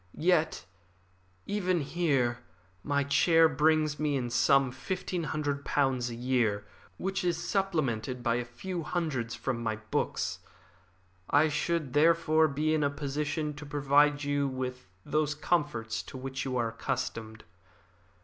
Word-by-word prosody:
Yet, 165 - +2 0.8
even 185 -4 0
here, 140 -6 0 0.4
my 140 +3 0
chair 165 +3 +5
brings 155 0 +2
me 150 -2 +1
in 120 -2 -3
some 135 +2 +4
fifteen 180 +5 -3
hundred 145 -2 -2
pounds 130 -4 +1
a 120 - -6
year, 115 -5 0 0.3
which 195 0 -2
is 175 -2 +1
supplemented 135 - -1
by 120 -1 +2
a 120 - -1
few 170 +9 -5
hundreds 150 -9 -2
from 125 -3 -3
my 110 -2 -1
books. 110 0 -2 0.9
I 150 +2 +4
should 155 -2 -1
therefore 160 +1 +4
be 155 +2 0
in 155 -1 +2
a 140 - +3
position 150 +1 -2
to 145 +1 -9
provide 145 0 +3
you 145 0 +1
with 125 -4 -5 0.2
those 150 -1 0
comforts 145 -9 -1
to - - -10
which 135 +1 -4
you 130 -1 -1
are 115 -2 +1
accustomed. 115 -2 -4
145 Hz, 140 wpm, -30 LUFS, 125-155 Hz, 0.9 s, chair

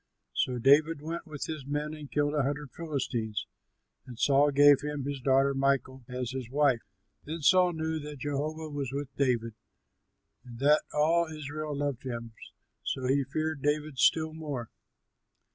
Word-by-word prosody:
So 125 -1 0
David 145 +5 +4
went 165 +2 -5
with 150 -3 -5
his 155 -3 -5
men 145 +2 -3
and 150 -2 -9
killed 145 0 +1
a 150 - +2
hundred 140 0 -2
Philistines; 125 -9 -3 0.6
and 125 -3 -9
Saul 140 +3 +4
gave 145 0 +6
him 145 -1 -3
his 140 -2 -4
daughter 135 +1 +3
Michal 135 -1 0
as 125 -1 -4
his 130 -3 -5
wife. 135 -3 +3 0.4
Then 160 +1 -6
Saul 180 +2 +5
knew 160 0 -2
that 150 0 -7
Jehovah 150 +3 -3
was 140 -3 -3
with 140 -1 -5
David 120 -4 +1 0.9
and 120 -2 -11
that 145 +4 +4
all 165 +3 +3
Israel 150 -1 -5
loved 140 -3 -2
him, 115 -3 -6 0.5
so 130 - -3
he 135 +2 +2
feared 155 +2 -2
David 150 -1 -1
still 155 +4 +3
more. 145 -7 -5
145 Hz, 160 wpm, -29 LUFS, 130-155 Hz, 0.9 s, gave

